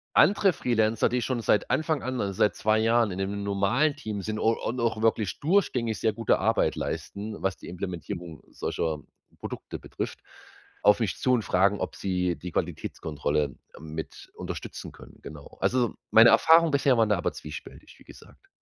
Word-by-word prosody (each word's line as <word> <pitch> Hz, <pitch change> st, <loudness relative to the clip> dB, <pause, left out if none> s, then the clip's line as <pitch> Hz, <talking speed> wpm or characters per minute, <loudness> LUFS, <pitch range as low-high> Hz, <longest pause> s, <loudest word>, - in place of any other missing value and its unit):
andere 195 Hz, -1 st, +5 dB
Freelancer, 110 Hz, -5 st, +1 dB
die 125 Hz, 0 st, 0 dB
schon 125 Hz, -1 st, -1 dB
seit 105 Hz, -2 st, +1 dB
Anfang 155 Hz, -2 st, 0 dB
an, 130 Hz, -1 st, -2 dB
also 100 Hz, -1 st, -2 dB
seit 105 Hz, +2 st, +2 dB
2 110 Hz, +1 st, +2 dB
Jahren 115 Hz, -1 st, +3 dB
in 90 Hz, -, -5 dB
dem 100 Hz, +1 st, -2 dB
normalen 100 Hz, +10 st, +1 dB
Team 105 Hz, -2 st, -5 dB
sind 110 Hz, +2 st, -4 dB
un 115 Hz, +1 st, +2 dB
und 125 Hz, +3 st, -3 dB
auch 115 Hz, -2 st, 0 dB
wirklich 110 Hz, -3 st, +1 dB
durchgängig 140 Hz, -, +1 dB
sehr 110 Hz, -, +1 dB
gute 115 Hz, -2 st, +1 dB
Arbeit -, -, +1 dB
leisten, 105 Hz, +2 st, -5 dB
was 95 Hz, 0 st, -1 dB
die -, -, -12 dB
Implementierung 85 Hz, -2 st, -6 dB
solcher 80 Hz, -2 st, -2 dB, 0.4 s
Produkte -, -, -7 dB
betrifft, -, -, -6 dB, 0.6 s
auf 105 Hz, +2 st, +5 dB
mich 110 Hz, -5 st, -1 dB
zu 130 Hz, -, +2 dB
und 120 Hz, -, +3 dB
fragen, 100 Hz, +2 st, +2 dB
ob -, -, -3 dB
sie 90 Hz, -2 st, -1 dB
die 90 Hz, +4 st, -7 dB
Qualitätskontrolle 75 Hz, -3 st, -2 dB, 0.2 s
mit 80 Hz, +1 st, -8 dB
unterstützen -, -, -7 dB
können, -, -, -15 dB
genau. 75 Hz, -2 st, -11 dB
Also, 125 Hz, -3 st, +1 dB, 0.2 s
meine 115 Hz, +1 st, +8 dB
Erfahrung 165 Hz, +1 st, +6 dB
bisher 140 Hz, -2 st, +3 dB
waren 110 Hz, -2 st, +3 dB
da 105 Hz, -, +3 dB
aber -, -, -2 dB
zwiespältig, 75 Hz, 0 st, -10 dB
wie -, -, -17 dB
gesagt. -, -, -16 dB
110 Hz, 175 wpm, -27 LUFS, 90-120 Hz, 0.6 s, meine